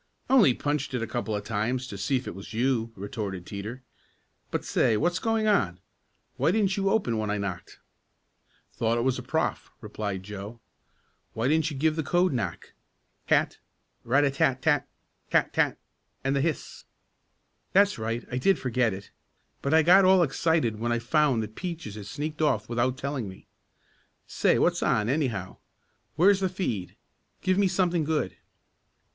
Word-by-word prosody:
"Only 215 - +6
punched 145 -2 -2
it 120 - -1
a - - 0
couple 110 -1 -3
of 105 - -3
times 115 +4 -1
to 110 - -8
see 135 +8 -1
if 130 - -2
it - - -4
was 95 +4 -9
you," 120 -1 +1
retorted 100 -3 -5
Teeter. 110 +6 -7 0.7
"But - - -3
say, 110 - +2
what's 175 +6 +1
going 225 +1 0
on? 135 - +2 0.6
Why - - +2
didn't 195 0 +2
you 195 -1 +1
open 160 - +1
when 105 -1 -2
I 105 - 0
knocked?" 95 -4 -5 1.0
"Thought 115 0 0
it 120 - 0
was 130 0 +1
a - - -5
prof.," 160 +6 -2
replied 105 -3 -5
Joe. 105 +3 -8 0.8
"Why 115 +3 0
didn't 155 +2 +2
you 145 - -6
give 155 +2 +2
the 160 - 0
code 175 +3 +2
knock. 100 -9 -4 0.5
Tat - - +2 0.4
rat 135 +5 +3
a 140 - +2
tat 135 -1 +1
tat 145 -4 +2 0.4
tat - - +2
tat - - +1 0.5
and 135 +1 +1
the 140 - +2
hiss." 160 0 -3 0.9
"That's 200 - +4
right, 115 +2 -3
I 125 - -1
did 195 +8 +3
forget 120 -4 0
it. 95 +1 -11 0.5
But 140 - -1
I 160 0 +5
got 185 +4 +7
all 185 -1 +6
excited 140 -7 +1
when 120 +1 -1
I 120 - +2
found 130 -1 +2
that 110 0 -8
Peaches 165 - -6
had 105 -1 -8
sneaked 150 +3 -4
off 125 -8 +1
without 120 +2 0
telling 135 -6 -3
me. 95 - -13 0.8
Say, - - +2
what's - - +2
on, 105 +1 +1
anyhow? 125 - -1 0.6
Where's 190 +5 +5
the 190 -1 0
feed? 120 - -3 0.5
Give 185 +1 +2
me 200 - +4
something 175 -3 +1
good." 155 0 -1
130 Hz, 175 wpm, -27 LUFS, 110-160 Hz, 1.0 s, got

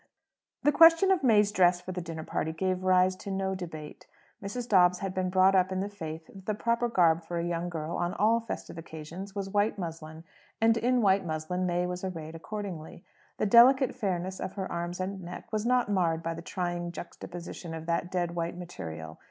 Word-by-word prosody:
The 295 - +5
question 330 +5 +7
of 375 - +3
May's 210 -4 +4
dress 180 -3 +4
for 180 +1 -7
the 180 0 -4
dinner 165 -2 -6
party 160 - -2
gave 185 +2 -1
rise 185 0 +4
to 200 - -8
no 190 0 -1
debate. 160 -5 -8 0.4
Mrs. 235 +5 -4
Dobbs 180 -4 +5
had 195 0 -4
been 185 -1 -1
brought 185 +1 +5
up 185 0 +3
in 185 - -1
the 200 +2 -2
faith 160 -5 -7
that 190 +2 -14
the 215 - 0
proper 235 +2 0
garb 170 -6 +3
for 170 +1 -4
a 170 - -1
young 175 0 -2
girl 160 -1 -4
on 175 +1 -1
all 220 +4 +3
festive 230 -6 -6
occasions 165 +5 -8
was 195 -1 -4
white 205 +1 +1
muslin; 160 -3 -7 0.4
and 225 0 +4
in 245 +1 +2
white 195 -1 +4
muslin 175 +3 -2
May 175 0 0
was 180 +1 -4
arrayed 165 -4 -5
accordingly. 175 -2 -7 0.3
The - - 0
delicate 250 +4 +6
fairness 190 -5 -2
of - - -4
her 190 -2 -4
arms 175 +1 -3
and 190 +1 -3
neck 175 0 -8
was 215 +1 0
not 250 -2 +3
marred 170 -5 +1
by 165 - -2
the 165 - -7
trying 175 0 -3
juxtaposition 170 -1 -8
of 160 0 -7
that 170 +1 -1
dead 175 -2 -1
white 170 0 -3
material. 80 - -8
180 Hz, 205 wpm, -29 LUFS, 170-200 Hz, 0.4 s, question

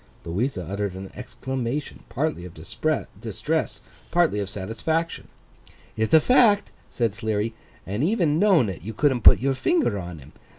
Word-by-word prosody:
Louisa 95 +4 -2
uttered 100 0 -3
an 95 0 -8
exclamation, 130 +2 -4
partly 150 - -2
of 90 -2 -10
distress, - - -3 0.3
partly 170 -11 +2
of 100 -2 -3
satisfaction. 115 - -2 0.7
'Ith 110 0 -1
a 160 - +8
fact,' 215 - +4 0.2
said 115 -4 -1
Sleary, 110 +1 -2 0.3
'and 105 +7 -2
even 165 -5 +2
knowin' 185 - +4
it, 95 -4 -5
you 110 +5 -7
couldn't 130 -1 +2
put - - +8
your 135 +2 +1
finger 295 - +1
on 90 -2 -7
him. 70 0 -14
120 Hz, 145 wpm, -24 LUFS, 100-155 Hz, 0.7 s, a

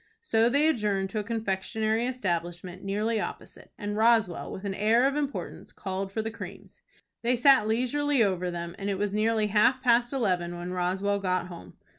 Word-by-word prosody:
So 225 - +3
they 285 +5 +3
adjourned 205 -9 0
to 215 - -2
a - - -2
confectionery 220 +1 -1
establishment 180 -6 -3
nearly 210 +3 0
opposite, - - -8
and 205 -1 -4
Roswell, 220 -5 +2
with 190 - -7
an 195 - -2
air 220 +5 +3
of 275 +1 +1
importance, 285 -1 -4
called 190 0 -4
for 220 +2 -2
the 225 - -3
creams. 230 - -10 0.4
They 240 +2 +2
sat 255 -2 +5
leisurely 255 +4 +1
over 185 -3 0
them, 170 -1 -5
and 200 0 -3
it 195 - -1
was 205 0 -1
nearly 215 0 +1
half 215 +5 +4
past 240 -1 +3
eleven 180 -9 -1
when 175 +1 -5
Roswell 190 +3 0
got 185 -2 -1
home. 90 - -11
210 Hz, 180 wpm, -27 LUFS, 190-235 Hz, 0.4 s, sat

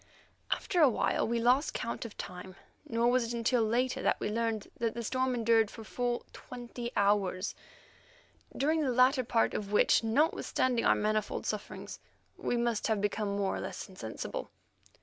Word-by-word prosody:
After 355 - +1
a 295 - +8
while 235 - +1
we 235 +1 0
lost 250 +6 +3
count 235 - -3
of 225 - -9
time, 180 +1 -7 0.3
nor 230 +1 +2
was 255 0 +3
it 235 +1 -3
until 235 +1 +2
later 240 +4 +1
that - - +1
we 210 - -2
learned 225 -1 -1
that 230 -1 -1
the 235 - -3
storm 255 +2 0
endured 225 -2 +3
for 225 - -10
full 245 +2 -2
twenty 240 -1 -7
hours, 200 -1 +1 1.0
during 310 +3 +2
the 275 -4 +1
latter 255 +2 +4
part 230 -1 +1
of 205 -1 -4
which, 210 - +4
notwithstanding 245 -1 +1
our - - +5
manifold 215 0 -1
sufferings, - - -5 0.4
we 245 - -1
must 235 -2 0
have 220 -2 +1
become 205 0 -1
more 195 -1 0
or - - -4
less - - -6
insensible. 120 - -6
230 Hz, 170 wpm, -31 LUFS, 210-245 Hz, 1.0 s, a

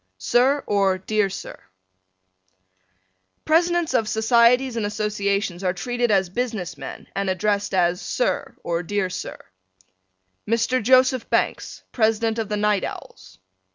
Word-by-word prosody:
Sir: 255 - +2
or 195 -2 +2
Dear 205 +1 0
Sir: 195 - -8 1.8
Presidents 345 +1 +2
of 225 -4 +1
Societies 235 +3 +3
and 225 - -1
Associations 200 -3 -2
are 180 -1 +1
treated 245 +5 -1
as 190 -4 +2
business 220 -6 -3
men - - -9
and 195 -1 -1
addressed 205 +2 0
as 180 +1 +2
Sir - - -2
or 170 0 -1
Dear 190 +1 -2
Sir. - - -6 1.1
Mr. 230 +3 +1
Joseph 255 +1 +3
Banks, - - -1
President 225 0 +1
of 220 -2 -3
the 210 - -1
Night 210 -1 +1
Owls. 95 0 -9
210 Hz, 125 wpm, -23 LUFS, 190-240 Hz, 1.8 s, Societies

